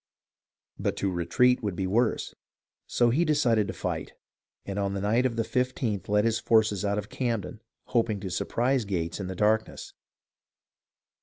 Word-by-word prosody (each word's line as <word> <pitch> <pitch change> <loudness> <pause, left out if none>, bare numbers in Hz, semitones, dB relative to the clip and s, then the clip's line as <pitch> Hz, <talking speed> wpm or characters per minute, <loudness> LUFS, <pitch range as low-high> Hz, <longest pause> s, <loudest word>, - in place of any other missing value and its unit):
But - - -1
to 100 - 0
retreat 125 +9 +2
would 100 -5 -2
be 95 - -2
worse, 110 +5 0 0.5
so 120 -1 +2
he 155 +8 +2
decided 120 -10 +2
to - - -4
fight; - - -4 0.5
and 100 0 -4
on 100 0 -1
the - - -2
night 115 +6 +2
of 115 - -5
the 115 - 0
15th 120 -6 -1
led 105 +1 +3
his 115 -1 +1
forces 110 -3 +2
out 100 0 0
of 105 -1 -3
Camden, 115 -3 -3 0.2
hoping 115 -4 0
to 95 -3 -5
surprise 120 +8 0
Gates 90 -4 -3
in 95 - -4
the 95 - -5
darkness. 110 +3 0
110 Hz, 165 wpm, -27 LUFS, 100-120 Hz, 0.5 s, led